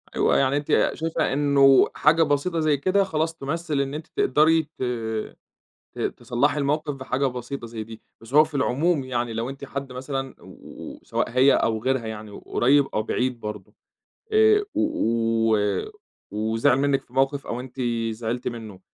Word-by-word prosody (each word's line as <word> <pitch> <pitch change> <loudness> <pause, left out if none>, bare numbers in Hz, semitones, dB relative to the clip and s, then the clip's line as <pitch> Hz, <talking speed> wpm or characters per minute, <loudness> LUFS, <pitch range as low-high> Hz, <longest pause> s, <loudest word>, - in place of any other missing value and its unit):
أيوه، - - +3
يعني 135 +1 +2
أنتِ 145 - +2
شايفة 160 -3 -1
إنه 140 -1 +5
حاجة 165 +2 +4
بسيطة 155 +3 0
زي 155 -2 +2
كده 185 +7 +2
خلاص 165 -3 -1
تُمثِّل 155 0 -2
إن 140 +1 -3
أنتِ 155 +1 -6
تقدري 160 +4 +3 0.2
ت - - -2 1.1
ت - - -11
تصلّحي 140 +5 0
الموقِف 145 +1 -1
بحاجة 130 +1 -2
بسيطة 125 0 -6
زي 115 -1 -6
دي، 110 0 -11 0.2
بس 115 +3 -13
هو 150 +1 +8
في 155 -1 -8
العموم 140 +3 +1
يعني 120 -2 -2
لو 115 +3 -3
أنتِ 140 +1 -8
حد 140 -1 -6
مثلًا 135 +1 -5
و - - -11
سواء - - -2
هي 130 +3 +4
أو 110 -1 0
غيرها 130 -3 0
يعني 110 -1 -7
وقريّب 140 +7 +2
أو 110 - 0
بعيد 125 +2 -1
برضه 105 -3 -7 0.6
آآ، 435 -1 +5
و 115 - +1
و 105 - -1 0.4
وزعِل 110 +3 +1
منِّك 140 0 +1
في 125 - -25
موقِف 135 +1 0
أو 120 - -3
أنتِ 130 +1 -7 0.3
زعلتِ 115 +2 -4
منّه 110 -5 -7
135 Hz, 165 wpm, -24 LUFS, 115-150 Hz, 1.1 s, هو